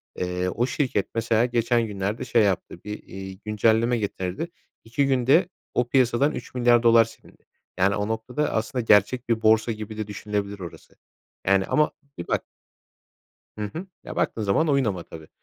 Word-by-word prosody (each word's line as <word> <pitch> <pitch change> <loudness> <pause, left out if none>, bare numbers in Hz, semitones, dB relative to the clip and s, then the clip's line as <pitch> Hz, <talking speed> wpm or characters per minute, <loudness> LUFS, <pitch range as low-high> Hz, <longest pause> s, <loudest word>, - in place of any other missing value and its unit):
eee, 90 0 -2
o 120 +6 0
şirket, 130 -6 -1
mesela, 115 0 +2
geçen 120 -1 +1
günlerde 100 +2 -3
şey 115 - +3
yaptı; 95 -3 -1
bir, 95 -2 -7
ııı, 95 - -10
güncelleme 110 +3 +2
getirdi. 100 - -3 0.4
2 120 +5 0
günde 135 +7 +3 0.2
o 125 - +1
piyasadan 130 +3 +3
3 - - -8
milyar 120 -1 +4
dolar 115 -1 +6
silindi. 115 0 -17 0.3
Yani, 100 +2 +3
o 105 0 -1
noktada 125 +7 -2
aslında 115 +3 -1
gerçek 115 +4 +3
bir 115 -1 +1
borsa 110 +1 +4
gibi 110 0 -6
de 110 -1 -3
düşünülebilir 100 0 -4
orası. 85 -3 -10 0.5
Yani, 95 0 +4
ama 150 0 +2 0.3
bir 85 - -6
bak - - 0 1.2
Hı 105 - -2
hı. 175 +4 -5 0.2
Ya, - - -8
baktığın 110 - 0
zaman 105 +11 +2
oyun 140 -2 +3
ama 95 -6 -2
tabii. 80 -2 -12
110 Hz, 165 wpm, -25 LUFS, 100-120 Hz, 1.2 s, dolar